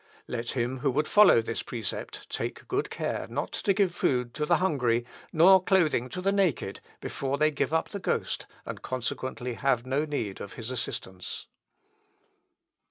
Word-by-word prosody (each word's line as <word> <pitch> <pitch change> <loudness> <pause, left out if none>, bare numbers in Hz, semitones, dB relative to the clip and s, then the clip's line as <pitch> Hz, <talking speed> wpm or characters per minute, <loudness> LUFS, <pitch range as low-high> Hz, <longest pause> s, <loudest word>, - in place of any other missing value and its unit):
Let 120 0 -3
him 125 +2 -1
who 140 - +1
would 150 +4 +1
follow 205 - +7
this 115 0 -3
precept 115 -6 -5
take - - -4
good - - -1
care - - -3
not - - -3
to 200 - 0
give 195 -3 +2
food 125 -7 0
to 150 0 -2
the - - +5
hungry, 125 -10 +1 0.3
nor 185 +3 +7
clothing 160 -10 +3
to 180 - -5
the 195 +1 +2
naked, 180 - +1 0.2
before 135 0 -2
they 155 +1 +4
give 145 - -1
up 160 0 +1
the 200 - -5
ghost, - - -1 0.2
and, - - -6
consequently, 125 0 -3
have 125 -1 +1
no 135 +3 +1
need 115 -10 -3
of 100 - -7
his 115 +2 -6
assistance." 95 -7 -4
135 Hz, 165 wpm, -28 LUFS, 120-165 Hz, 0.3 s, follow